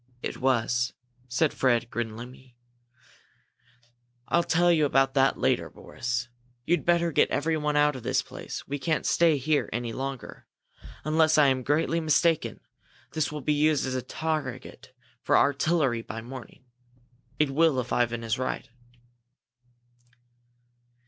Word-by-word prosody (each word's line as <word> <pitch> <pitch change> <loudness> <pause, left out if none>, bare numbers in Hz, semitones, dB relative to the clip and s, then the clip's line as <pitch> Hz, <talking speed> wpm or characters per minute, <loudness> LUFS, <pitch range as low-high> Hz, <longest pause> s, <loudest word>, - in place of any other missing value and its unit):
"It - - -4
was," 120 -2 +1 0.3
said 130 +5 +1
Fred, 120 -2 +1
grimly. 120 +2 -7 1.7
"I'll 170 - +3
tell 175 +1 +3
you 155 -3 +3
about 135 -1 +2
that 135 -1 +3
later, - - 0
Boris! 120 0 -4 0.4
You'd 175 +2 +1
better 170 -1 +2
get - - +3
everyone 150 0 0
out 150 0 +3
of 130 - -7
this - - 0
place. - - -8
We 145 +1 -3
can't 155 +4 -1
stay 165 -3 +3
here 145 +2 0
any 120 0 -3
longer. 135 0 -6 0.6
Unless 155 +1 +3
I'm 135 -3 +4
greatly 155 +5 +1
mistaken, 160 +1 +1 0.5
this 155 -1 -1
will 150 -1 -5
be 150 - +1
used 150 0 +2
as 130 - -3
a 130 - -1
target 140 -3 -5 0.3
for - - +3
artillery 140 -4 +2
by 115 0 -7
morning. 125 +2 -10 0.7
It 150 -1 +1
will 155 -1 +3
if 125 -1 -3
Ivan 120 -1 0
is 115 +2 -1
right." 130 - -3
135 Hz, 135 wpm, -27 LUFS, 125-155 Hz, 1.7 s, I'm